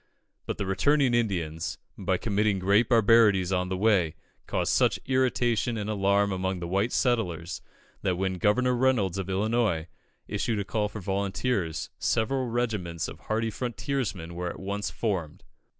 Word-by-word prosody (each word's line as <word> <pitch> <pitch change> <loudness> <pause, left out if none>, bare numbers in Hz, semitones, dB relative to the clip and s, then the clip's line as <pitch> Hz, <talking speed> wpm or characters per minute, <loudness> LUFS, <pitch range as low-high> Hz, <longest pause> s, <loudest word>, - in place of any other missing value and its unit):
But - - -3
the 100 - -2
returning 130 +7 +2
Indians, 85 -9 -1 0.2
by - - 0
committing 105 0 +1
great 100 +5 +3
barbarities 110 -5 +5
on 90 0 0
the 95 - -2
way, 95 -6 +2 0.3
caused - - 0
such - - +3
irritation 125 -3 +1
and 105 0 -3
alarm 100 0 +2
among 95 0 -2
the 85 - -4
white 100 +6 0
settlers, 90 - 0 0.4
that 90 - 0
when 95 0 -2
Governor 125 +6 +3
Reynolds 120 -7 +1
of 95 0 -4
Illinois, 100 -4 +1 0.4
issued 115 - -1
a 100 - -2
call 105 +1 -1
for 105 - -7
volunteers, 95 -1 -1
several 130 +3 0
regiments 105 -9 -2
of - - -9
hardy 110 +1 -1
frontiersmen 115 - -3
were 90 +1 -3
at - - -8
once 100 +2 -3
formed. 95 -9 -3
100 Hz, 150 wpm, -27 LUFS, 95-115 Hz, 0.4 s, barbarities